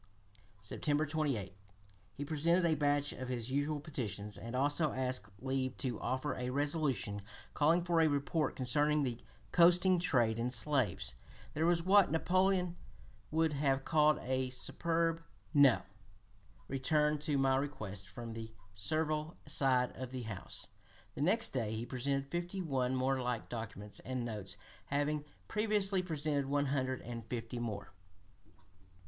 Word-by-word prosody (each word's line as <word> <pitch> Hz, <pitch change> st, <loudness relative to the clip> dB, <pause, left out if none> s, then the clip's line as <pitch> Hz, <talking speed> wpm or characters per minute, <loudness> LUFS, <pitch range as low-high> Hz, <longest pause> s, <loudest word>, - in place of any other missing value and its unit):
September 145 Hz, +7 st, 0 dB
28 140 Hz, -, -1 dB, 0.6 s
he 145 Hz, -, -4 dB
presented 165 Hz, +4 st, +2 dB
a 165 Hz, -, +4 dB
batch 145 Hz, -1 st, +1 dB
of 130 Hz, -, -6 dB
his 125 Hz, -1 st, -3 dB
usual 145 Hz, +2 st, 0 dB
petitions, 105 Hz, -8 st, -4 dB
and 115 Hz, +2 st, -6 dB
also 145 Hz, +3 st, +2 dB
asked 130 Hz, -4 st, -1 dB
leave 130 Hz, +1 st, -2 dB
to 125 Hz, -4 st, -2 dB
offer 130 Hz, +3 st, -1 dB
a 125 Hz, -1 st, -3 dB
resolution 140 Hz, -7 st, 0 dB, 0.3 s
calling 165 Hz, +4 st, +3 dB
for 170 Hz, -2 st, +3 dB
a 160 Hz, -, +5 dB
report 145 Hz, +1 st, 0 dB
concerning 145 Hz, +4 st, +2 dB
the 120 Hz, -3 st, -2 dB, 0.3 s
coasting 180 Hz, +1 st, +5 dB
trade 120 Hz, -9 st, +2 dB
in 120 Hz, +1 st, 0 dB
slaves. 125 Hz, -, +1 dB, 0.4 s
"There 160 Hz, +3 st, +1 dB
was 170 Hz, -1 st, +3 dB
what 195 Hz, +1 st, +6 dB
Napoleon 180 Hz, +2 st, +2 dB, 0.5 s
would 160 Hz, 0 st, +2 dB
have 135 Hz, -2 st, +1 dB
called 155 Hz, -1 st, +4 dB
a 130 Hz, 0 st, 0 dB
superb 165 Hz, +5 st, 0 dB, 0.3 s
NO! 140 Hz, -5 st, +6 dB, 0.8 s
returned 150 Hz, +2 st, +1 dB
to 150 Hz, -1 st, 0 dB
my 135 Hz, -1 st, +3 dB
request 110 Hz, -9 st, -3 dB
from 115 Hz, +4 st, -7 dB
the 110 Hz, 0 st, -7 dB, 0.2 s
servile 155 Hz, -, -1 dB
side 135 Hz, -3 st, +2 dB
of 130 Hz, -1 st, -5 dB
the 130 Hz, -1 st, -5 dB
House." 105 Hz, -5 st, -6 dB, 0.5 s
The -, -, -5 dB
next 215 Hz, +9 st, +3 dB
day 110 Hz, -4 st, -2 dB
he 115 Hz, +2 st, -3 dB
presented 135 Hz, +3 st, -2 dB
fifty 175 Hz, +2 st, -3 dB
one 130 Hz, -7 st, 0 dB
more 130 Hz, +1 st, +1 dB
like 125 Hz, -2 st, -2 dB
documents, 105 Hz, -3 st, -6 dB
and 130 Hz, -2 st, -3 dB
notes 105 Hz, -4 st, -4 dB, 0.3 s
having 145 Hz, +1 st, 0 dB, 0.2 s
previously 210 Hz, -3 st, +1 dB
presented 150 Hz, -5 st, -1 dB
one 145 Hz, +1 st, +1 dB
hundred 130 Hz, -2 st, -1 dB
and 120 Hz, -1 st, -6 dB
fifty 120 Hz, 0 st, -4 dB
more. 105 Hz, -4 st, -4 dB
140 Hz, 140 wpm, -34 LUFS, 125-155 Hz, 0.8 s, what